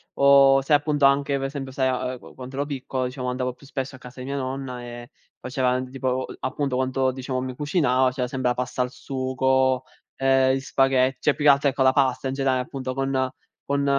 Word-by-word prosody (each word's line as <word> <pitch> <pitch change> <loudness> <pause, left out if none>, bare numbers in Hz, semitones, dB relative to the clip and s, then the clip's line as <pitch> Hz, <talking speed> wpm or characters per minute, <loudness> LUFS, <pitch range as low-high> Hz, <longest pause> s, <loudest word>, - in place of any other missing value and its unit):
o 140 -1 +6
se 145 +3 0
appunto 145 -1 +3
anche 140 0 +3
per 135 - -3
esempio, 135 -1 -5
sai 130 0 0
a 130 0 -1
a - - -7
quando 130 +2 -11
ero 140 +1 -1
piccolo 130 -2 -3
diciamo 125 0 -4
andavo 125 0 -2
più 140 - -18
spesso 135 -1 -4
a - - -13
casa 125 +1 -12
di 125 - -6
mia 140 +1 -3
nonna 130 -2 -4
e 120 +1 -9 0.3
faceva 125 -1 0
tipo, 130 0 -2
appunto, 135 -2 -2
quando 130 0 +1
diciamo 130 0 -3
mi 130 -1 -4
cucinava, 145 -4 +2
c'era 125 -1 -2
sempre 130 -1 -1
la 125 - 0
pasta 125 0 -2
al 125 - 0
sugo, 130 0 0 0.3
ehm, 135 0 +3
gli - - -1
spaghe 135 -1 +2
cioè 150 - +2
più 150 - -3
che 145 - +9
altro 140 +1 +3
ecco 135 0 0
la 130 0 +5
pasta 135 -1 +1
in 130 - -2
genera 135 -1 +1
appunto 130 0 -5
con 135 0 -1 0.5
con 140 0 0
130 Hz, 215 wpm, -24 LUFS, 130-135 Hz, 0.5 s, che